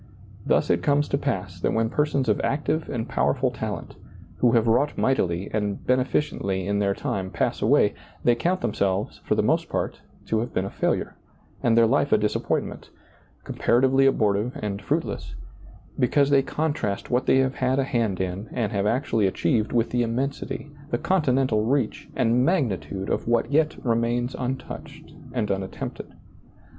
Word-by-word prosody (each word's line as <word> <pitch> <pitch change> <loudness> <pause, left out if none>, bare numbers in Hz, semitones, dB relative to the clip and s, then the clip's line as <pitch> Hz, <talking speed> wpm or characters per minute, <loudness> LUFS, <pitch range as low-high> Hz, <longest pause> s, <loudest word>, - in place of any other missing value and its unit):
Thus - - +3
it 85 - +2
comes 145 +7 +2
to - - +1
pass 95 -10 -3
that - - 0
when 115 0 +1
persons 150 -3 +1
of 105 - +2
active 155 +3 -1
and 115 -4 -3
powerful - - +1
talent, - - -5 0.4
who 120 -2 +3
have 115 -2 +4
wrought 125 +6 +2
mightily 95 -8 0
and 105 -2 -2
beneficently 125 -7 0
in 100 0 0
their 100 -1 +1
time, 95 -1 -3
pass - - -1
away, - - +4 0.3
they 120 - +5
count 175 +10 0
themselves, 100 -3 -1
for - - +1
the - - +2
most - - +1
part, - - -3 0.2
to 110 - 0
have 120 +2 -4
been 95 - +1
a 100 - -5
failure, - - -1 0.4
and 115 -1 +3
their 115 - +7
life 140 +4 +2
a - - +6
disappointment, 105 0 -2 0.5
comparatively 130 +3 +3
abortive 110 -1 +1
and 100 -1 -3
fruitless; - - -2 0.6
because 140 +3 +3
they 140 -1 +6
contrast 140 -9 -2
what 125 +1 +1
they - - +5
have 130 0 +1
had 130 +1 +1
a 135 - +3
hand 115 -8 -1
in 95 +3 -3
and 115 -3 -1
have 100 -1 0
actually 115 -3 +1
achieved 110 +3 0
with 115 -1 +1
the 120 - +1
immensity, 135 +4 -3 0.2
the - - 0
continental 135 - +1
reach, 125 0 -1
and 125 0 +3
magni 135 - +2
tude 85 +6 -6
of - - -1
what 120 +3 +1
yet 155 +1 +2
remains 120 +1 0
untouched 130 +1 -6 0.2
and 120 -4 -1
unat 95 -1 -1
tempted. - - -6
120 Hz, 170 wpm, -25 LUFS, 105-135 Hz, 0.6 s, their